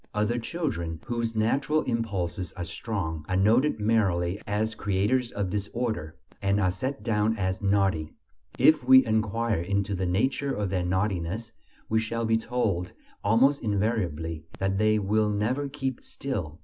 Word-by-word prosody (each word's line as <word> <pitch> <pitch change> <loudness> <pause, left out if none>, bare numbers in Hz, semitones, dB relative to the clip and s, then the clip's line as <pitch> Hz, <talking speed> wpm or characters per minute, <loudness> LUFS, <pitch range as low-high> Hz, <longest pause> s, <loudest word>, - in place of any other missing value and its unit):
Other 105 +3 +1
children, 115 - -3
whose 115 -1 -2
natural 140 +8 +1
impulses 100 -7 -2
are 90 - -5
strong, 85 -3 -4
are 95 - +1
noted 110 +9 +3
merely 100 -4 +1
as 105 +2 0
creators 105 +5 0
of 100 -3 -2
disorder, 105 -5 -3 0.3
and 100 +1 +2
are 95 -3 +2
set 130 +5 -4
down 110 0 +1
as 95 -1 -1
"naughty." 95 -6 +1 0.5
If 155 -4 +5
we 130 +1 +7
enquire 110 -2 0
into 100 +2 -1
the 95 -1 -1
nature 130 +9 0
of 105 -3 -2
their 90 -2 0
naughtiness, 95 +3 -1 0.4
we 110 - +2
shall 115 +1 -2
be 115 0 +3
told 110 -7 -1 0.3
almost 130 +7 +4
invariably 95 -8 -1
that 95 0 0
"they 110 +1 +3
will 105 +1 +1
never 120 +8 0
keep 135 -3 -3
still." 90 - -4
105 Hz, 150 wpm, -27 LUFS, 95-115 Hz, 0.5 s, we